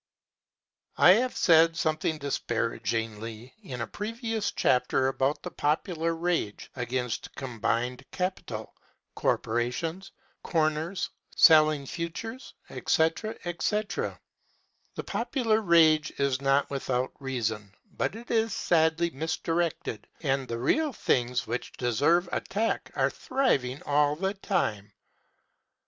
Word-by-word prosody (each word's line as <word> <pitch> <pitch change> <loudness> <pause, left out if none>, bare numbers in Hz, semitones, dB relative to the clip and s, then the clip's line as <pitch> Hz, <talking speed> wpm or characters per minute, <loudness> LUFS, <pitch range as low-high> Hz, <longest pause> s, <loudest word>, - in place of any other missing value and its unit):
I 180 - +8
have 245 +6 +2
said 165 -1 +5
something 155 -1 0
disparagingly 115 -3 -3
in 130 - -6
a - - -1
previous 225 - -3
chapter 125 +1 +2
about 135 +2 0
the - - -5
popular 165 +2 0
rage 165 -11 -2
against 125 -1 -3
combined 120 0 -2
capital, 185 0 -4 0.4
corporations, 140 +11 -1 0.3
corners, 160 +2 0 0.2
selling 155 -3 +6
futures, 180 - -6 0.2
etc., 175 +7 0
etc. 205 +4 -2 0.8
The - - -4
popular 225 -5 0
rage 160 -5 +5
is 140 -1 0
not 140 +1 +2
without 130 -2 -1
reason, 110 -7 -3 0.2
but - - -1
it 235 +2 -8
is 225 -2 +2
sadly 165 0 +2
misdirected 160 -4 -2
and 135 -4 0
the 115 - -3
real 290 - +1
things 125 - 0
which 120 +2 -4
deserve 145 - +2
attack 225 +3 -1
are - - +2
thriving 140 - 0
all 145 0 +3
the 190 +4 -1
time. 105 - -2
155 Hz, 105 wpm, -28 LUFS, 125-175 Hz, 0.8 s, I